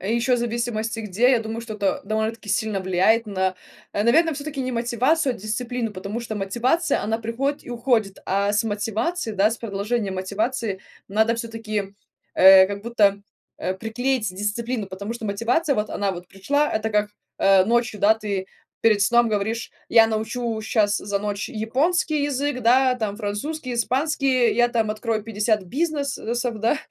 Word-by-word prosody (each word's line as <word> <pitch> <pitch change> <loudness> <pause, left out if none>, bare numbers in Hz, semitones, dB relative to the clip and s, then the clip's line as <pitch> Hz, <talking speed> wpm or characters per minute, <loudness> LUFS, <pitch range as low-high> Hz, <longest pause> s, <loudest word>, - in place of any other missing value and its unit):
еще 235 +6 +1
в - - 0
зависимости 230 -1 -2
где, 220 +4 +2
я 250 - +4
думаю, 225 +1 -5
что 230 -2 -7
это 200 -2 0
довольно-таки 220 +1 -2
сильно 205 0 0
влияет 190 +5 +2
на, 190 -2 -1 0.4
наверное, 260 +11 +3
всё-таки 290 -1 -5
не 255 - -3
мотивацию, 250 +5 +1
а - - -11
дисциплину. 230 +2 -3
Потому 200 +5 -5
что 225 -2 -5
мотивация- 240 - 0
она 220 +2 -1
приходит 250 +6 -2
и - - -8
уходит, 230 -4 0
а 200 +1 +1
с 210 +2 +1
мотивации, 225 - -2
да, 205 +1 +3
с 230 - -3
продолжением 205 -1 -2
мотивации 205 +2 -2 0.3
надо 220 +3 +2
всё-таки, 225 -3 -4 0.4
э, 190 0 +8
как 200 +1 -6
будто, 215 -4 +3 0.4
э, 185 - -2
приклеить 225 +1 -1
дисциплину. 210 +3 -3
Потому 200 +4 -6
что 225 -2 -6
мотивация- 245 +9 +1
вот 210 0 -1
она 200 -1 -1
вот 180 -1 -7
пришла, 285 +10 0
это 220 0 0
как, 210 0 +1 0.3
э, 195 -1 +5
ночью, 230 -2 +1
да, 215 +2 +5
ты 200 -3 -3 0.4
перед 215 -2 +4
сном 235 +3 +4
говоришь: 220 +2 -2 0.2
"Я 225 -1 +6
научу 225 +1 -2
щас 215 -1 +1
за 200 0 -2
ночь 205 0 -3
японский 290 +8 0
язык, 280 -1 -1
да, 255 +2 +4
там 215 -4 -3
французский, 245 +7 -4
испанский, 255 +1 +1
я 240 0 +4
там 225 -3 0
открою 215 0 -2
50 215 -1 0
бизнес 285 - -1 0.2
сов, 240 -2 -2
да". 230 +7 +2
225 Hz, 165 wpm, -23 LUFS, 205-245 Hz, 0.4 s, э